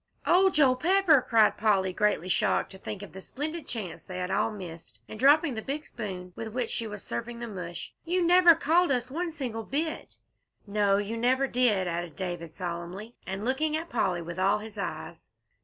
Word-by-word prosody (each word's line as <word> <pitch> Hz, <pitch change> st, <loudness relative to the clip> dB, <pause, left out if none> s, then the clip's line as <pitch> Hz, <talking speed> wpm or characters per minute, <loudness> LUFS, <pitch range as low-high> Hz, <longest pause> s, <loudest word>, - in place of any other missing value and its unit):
"Oh, 380 Hz, +2 st, +5 dB
Joel 275 Hz, -7 st, +4 dB
Pepper!" 345 Hz, -1 st, +4 dB
cried 225 Hz, -2 st, +4 dB
Polly, 195 Hz, -4 st, +2 dB
greatly 210 Hz, -3 st, +1 dB
shocked 185 Hz, -, +1 dB
to 190 Hz, -, -10 dB
think 205 Hz, 0 st, -6 dB
of 200 Hz, -, -11 dB
the 190 Hz, -, -8 dB
splendid 310 Hz, -, -5 dB
chance 210 Hz, -7 st, -5 dB
they 185 Hz, -1 st, -7 dB
all 195 Hz, +4 st, 0 dB
had 215 Hz, -, -8 dB
missed, 165 Hz, -, -10 dB
and 215 Hz, -, -9 dB
dropping 290 Hz, +2 st, +5 dB
the 220 Hz, -, -4 dB
big 290 Hz, +6 st, -4 dB
spoon 185 Hz, -5 st, -7 dB
with 225 Hz, 0 st, -6 dB
which 245 Hz, -3 st, -1 dB
she 230 Hz, -, -2 dB
was 210 Hz, -2 st, -7 dB
serving 175 Hz, -, -5 dB
the 235 Hz, 0 st, -5 dB
mush, 180 Hz, -5 st, -7 dB
"you 355 Hz, +1 st, +1 dB
never 350 Hz, -1 st, +7 dB
called 335 Hz, +5 st, +3 dB
us 250 Hz, -1 st, -1 dB
one 340 Hz, +3 st, -2 dB
single 250 Hz, -8 st, -4 dB
bit!" 310 Hz, +7 st, -3 dB, 0.5 s
"No, 200 Hz, -1 st, +2 dB
you 205 Hz, +3 st, -3 dB
never 255 Hz, +3 st, +2 dB
did!" 235 Hz, -8 st, +2 dB
added 170 Hz, -2 st, -4 dB
David, 175 Hz, -4 st, -5 dB
solemnly, 180 Hz, +5 st, -6 dB
and 195 Hz, +3 st, -4 dB
looking 305 Hz, +5 st, +1 dB
at 330 Hz, +1 st, -6 dB
Polly 185 Hz, -7 st, 0 dB
with 170 Hz, +2 st, -6 dB
all 195 Hz, +2 st, +3 dB
his 215 Hz, 0 st, -9 dB
eyes. -, -, -6 dB
220 Hz, 195 wpm, -28 LUFS, 190-280 Hz, 0.5 s, never